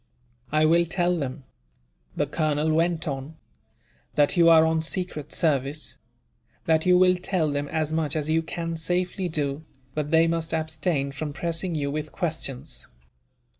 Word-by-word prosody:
"I 155 Hz, +1 st, +4 dB
will 170 Hz, +2 st, +4 dB
tell 175 Hz, +1 st, +1 dB
them," 140 Hz, -3 st, -4 dB, 0.7 s
the 145 Hz, -, +2 dB
colonel 155 Hz, +1 st, 0 dB
went 165 Hz, 0 st, +1 dB
on, 140 Hz, +2 st, -4 dB, 0.8 s
"that 145 Hz, +3 st, +3 dB
you 170 Hz, -2 st, +6 dB
are 160 Hz, -1 st, +7 dB
on 160 Hz, 0 st, +1 dB
secret 160 Hz, -3 st, -4 dB
service; 145 Hz, -2 st, 0 dB, 0.7 s
that 160 Hz, +1 st, +2 dB
you 180 Hz, 0 st, +6 dB
will 185 Hz, 0 st, +5 dB
tell 180 Hz, -4 st, 0 dB
them 145 Hz, 0 st, -2 dB
as 155 Hz, 0 st, -1 dB
much 160 Hz, -1 st, -1 dB
as 155 Hz, -1 st, -1 dB
you 160 Hz, +1 st, +2 dB
can 165 Hz, 0 st, -4 dB
safely 180 Hz, +2 st, -1 dB
do, 145 Hz, -1 st, -1 dB, 0.3 s
but 150 Hz, 0 st, -2 dB
they 160 Hz, +1 st, +5 dB
must 165 Hz, 0 st, -1 dB
abstain 155 Hz, -2 st, -1 dB
from 150 Hz, +1 st, -5 dB
pressing 170 Hz, +2 st, -2 dB
you 140 Hz, -2 st, -1 dB
with 150 Hz, +1 st, -4 dB
questions. 140 Hz, -5 st, -3 dB
160 Hz, 155 wpm, -25 LUFS, 150-170 Hz, 0.8 s, are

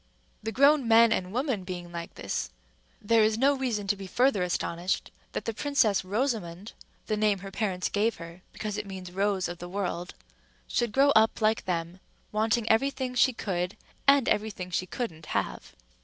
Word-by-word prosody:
The 220 Hz, +1 st, -3 dB
grown 280 Hz, +1 st, +4 dB
men 230 Hz, 0 st, +6 dB
and 185 Hz, -3 st, 0 dB
women 250 Hz, -4 st, -1 dB
being 175 Hz, -1 st, -6 dB
like 170 Hz, -1 st, -7 dB
this, -, -, -3 dB, 0.5 s
there 225 Hz, +2 st, +3 dB
is 215 Hz, 0 st, +2 dB
no 275 Hz, +4 st, +4 dB
reason 240 Hz, -6 st, -2 dB
to 195 Hz, -, +1 dB
be 195 Hz, -1 st, -8 dB
further 245 Hz, -1 st, +2 dB
astonished 175 Hz, 0 st, -1 dB, 0.2 s
that -, -, -4 dB
the 230 Hz, -, -2 dB
Princess 230 Hz, -6 st, +2 dB
Rosamond—the 210 Hz, -2 st, -3 dB
name 210 Hz, -1 st, +2 dB
her 195 Hz, +1 st, -9 dB
parents 190 Hz, -3 st, -1 dB
gave 215 Hz, +3 st, +1 dB
her 170 Hz, +1 st, -10 dB
because 210 Hz, -1 st, -4 dB
it 210 Hz, -, -6 dB
means 185 Hz, -2 st, -7 dB
Rose 195 Hz, 0 st, 0 dB
of 175 Hz, 0 st, -7 dB
the 175 Hz, -, -7 dB
World—should 175 Hz, -, -4 dB
grow 275 Hz, +4 st, +4 dB
up 220 Hz, -3 st, +4 dB
like 220 Hz, 0 st, +1 dB
them, 175 Hz, 0 st, -3 dB, 0.3 s
wanting 220 Hz, +1 st, +1 dB
every 225 Hz, +6 st, +4 dB
thing 260 Hz, -2 st, -4 dB
she 250 Hz, +1 st, +4 dB
could 180 Hz, -6 st, -3 dB, 0.3 s
and 275 Hz, -2 st, +6 dB
every 215 Hz, +1 st, +1 dB
thing 180 Hz, -3 st, -7 dB
she 185 Hz, +1 st, -1 dB
couldn't 165 Hz, -9 st, -5 dB
have. -, -, -4 dB
210 Hz, 175 wpm, -28 LUFS, 180-230 Hz, 0.5 s, men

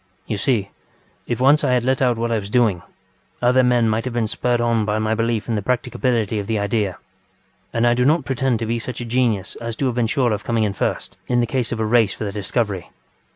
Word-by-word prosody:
You 105 Hz, -, -3 dB
see, 100 Hz, -3 st, 0 dB, 0.6 s
if 120 Hz, -, -2 dB
once 140 Hz, +4 st, +4 dB
I 125 Hz, -, +2 dB
had 125 Hz, -2 st, +2 dB
let 130 Hz, +1 st, +1 dB
out 125 Hz, -3 st, +2 dB
what 115 Hz, +1 st, -1 dB
I 115 Hz, -, +1 dB
was 100 Hz, -1 st, -7 dB
doing, 110 Hz, -7 st, +2 dB, 0.6 s
other 125 Hz, +1 st, +4 dB
men 125 Hz, -2 st, +3 dB
might 110 Hz, +1 st, 0 dB
have 125 Hz, -2 st, -4 dB
been 120 Hz, -2 st, +1 dB
spurred 120 Hz, +3 st, 0 dB
on 115 Hz, -2 st, +1 dB
by 105 Hz, 0 st, 0 dB
my 110 Hz, 0 st, 0 dB
belief 115 Hz, -1 st, -1 dB
in 115 Hz, -, -1 dB
the 105 Hz, -, 0 dB
practicability 115 Hz, -1 st, 0 dB
of 100 Hz, -, -5 dB
the 110 Hz, -, 0 dB
idea; 100 Hz, -2 st, -1 dB, 0.7 s
and 115 Hz, 0 st, +1 dB
I 120 Hz, -, +4 dB
do 125 Hz, +1 st, +1 dB
not 150 Hz, +2 st, +3 dB
pretend 130 Hz, -1 st, 0 dB
to 115 Hz, -, -3 dB
be 115 Hz, +1 st, -1 dB
such 125 Hz, +2 st, -5 dB
a 120 Hz, -, -4 dB
genius 115 Hz, -5 st, 0 dB
as 115 Hz, -1 st, -5 dB
to 135 Hz, -, -2 dB
have 125 Hz, -, +1 dB
been 120 Hz, -1 st, +1 dB
sure 120 Hz, -2 st, +1 dB
of 105 Hz, -, -4 dB
coming 115 Hz, -2 st, 0 dB
in 105 Hz, -2 st, 0 dB
first, -, -, -3 dB
in 120 Hz, -1 st, +2 dB
the 120 Hz, -, +3 dB
case 120 Hz, 0 st, -1 dB
of 120 Hz, -, -3 dB
a 110 Hz, -, 0 dB
race 110 Hz, -3 st, +3 dB
for -, -, -6 dB
the 100 Hz, -, -3 dB
discovery. 100 Hz, -2 st, -2 dB
115 Hz, 250 wpm, -21 LUFS, 110-125 Hz, 0.7 s, once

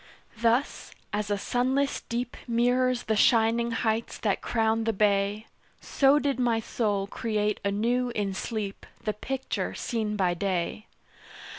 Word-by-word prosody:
Thus, 235 Hz, +4 st, 0 dB, 0.2 s
as 210 Hz, 0 st, -1 dB
a 205 Hz, -, +1 dB
sunless 260 Hz, +6 st, 0 dB
deep 240 Hz, +1 st, -2 dB
Mirrors 245 Hz, +1 st, +2 dB
the 220 Hz, -, 0 dB
shining 230 Hz, +1 st, +4 dB
heights 225 Hz, 0 st, -1 dB
that 205 Hz, -3 st, 0 dB
crown 225 Hz, -1 st, +1 dB
the 225 Hz, -, +1 dB
bay, 205 Hz, +1 st, +1 dB, 0.3 s
So 275 Hz, +1 st, +3 dB
did 280 Hz, -3 st, 0 dB
my 235 Hz, -2 st, +2 dB
soul 210 Hz, -3 st, -1 dB
create 210 Hz, 0 st, -1 dB
anew 235 Hz, +5 st, +1 dB
in 200 Hz, -2 st, -1 dB
sleep 205 Hz, 0 st, -4 dB, 0.2 s
The 215 Hz, -, -1 dB
picture 265 Hz, +5 st, -3 dB
seen 220 Hz, -3 st, -2 dB
by 185 Hz, -3 st, +2 dB
day. 185 Hz, +3 st, -2 dB
225 Hz, 135 wpm, -27 LUFS, 205-245 Hz, 0.3 s, shining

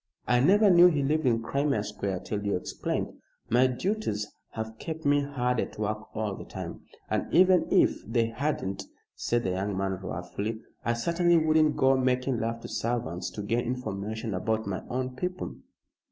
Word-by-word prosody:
I 125 Hz, +1 st, +4 dB
never 200 Hz, -, +5 dB
knew 175 Hz, 0 st, +8 dB
he 150 Hz, -5 st, +2 dB
lived 150 Hz, +1 st, +1 dB
in 115 Hz, -2 st, +2 dB
Crimea 140 Hz, -2 st, 0 dB
Square 95 Hz, -3 st, -3 dB
till 105 Hz, 0 st, -3 dB
you 100 Hz, -1 st, 0 dB
explained. 90 Hz, -, -3 dB, 0.3 s
My 125 Hz, +2 st, +5 dB
duties 130 Hz, -, -1 dB, 0.3 s
have 110 Hz, 0 st, -5 dB
kept 160 Hz, -1 st, -6 dB
me 145 Hz, 0 st, +4 dB
hard 125 Hz, -3 st, -1 dB
at -, -, -3 dB
work 110 Hz, +1 st, -2 dB
all 110 Hz, -2 st, -1 dB
the -, -, -8 dB
time. -, -, -7 dB, 0.3 s
And -, -, -1 dB
even 185 Hz, 0 st, +5 dB
if -, -, +3 dB
they 115 Hz, +1 st, +2 dB
hadn't," 115 Hz, -6 st, -2 dB, 0.3 s
said 120 Hz, 0 st, 0 dB
the 95 Hz, -, 0 dB
young 95 Hz, +1 st, -2 dB
man, 95 Hz, -1 st, -1 dB
wrathfully, 100 Hz, +5 st, -4 dB, 0.2 s
"I 120 Hz, -, +1 dB
certainly 170 Hz, +8 st, +2 dB
wouldn't 155 Hz, -1 st, +3 dB
go 135 Hz, 0 st, +5 dB
making 130 Hz, -1 st, +1 dB
love 115 Hz, +1 st, -2 dB
to -, -, -7 dB
servants 110 Hz, -7 st, -2 dB
to 105 Hz, -, -5 dB
gain 115 Hz, +4 st, 0 dB
information 110 Hz, -3 st, -3 dB
about 110 Hz, +4 st, -1 dB
my 100 Hz, -2 st, -3 dB
own 130 Hz, 0 st, -2 dB
people." 180 Hz, +6 st, -4 dB
120 Hz, 175 wpm, -28 LUFS, 105-145 Hz, 0.3 s, knew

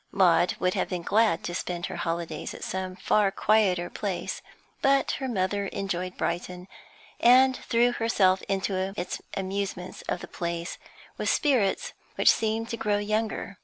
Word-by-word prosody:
Maud 180 Hz, -2 st, +4 dB
would 185 Hz, 0 st, +1 dB
have -, -, -1 dB
been 180 Hz, -2 st, -3 dB
glad 215 Hz, -2 st, +2 dB
to 175 Hz, -, -4 dB
spend 175 Hz, 0 st, -3 dB
her -, -, -5 dB
holidays 165 Hz, 0 st, -3 dB
at -, -, -9 dB
some 185 Hz, -1 st, -3 dB
far 200 Hz, +2 st, +2 dB
quieter 195 Hz, -4 st, +2 dB
place, 180 Hz, -2 st, -4 dB, 0.4 s
but 275 Hz, 0 st, +3 dB
her 265 Hz, -, -1 dB
mother 200 Hz, -3 st, -1 dB
enjoyed 185 Hz, -2 st, -3 dB
Brighton, 180 Hz, +1 st, -3 dB, 0.5 s
and 255 Hz, +2 st, +6 dB
threw 240 Hz, 0 st, +2 dB
herself 195 Hz, -5 st, +2 dB
into 195 Hz, 0 st, -1 dB
its 180 Hz, +1 st, -4 dB, 0.2 s
amusements 195 Hz, -1 st, -4 dB
of -, -, -1 dB
the -, -, -7 dB
place 170 Hz, 0 st, -4 dB, 0.4 s
with -, -, 0 dB
spirits 255 Hz, -10 st, +1 dB, 0.2 s
which -, -, +6 dB
seemed 225 Hz, +1 st, -1 dB
to 230 Hz, -, -3 dB
grow 210 Hz, -2 st, +1 dB
younger. 215 Hz, -1 st, -2 dB
195 Hz, 155 wpm, -27 LUFS, 180-220 Hz, 0.5 s, and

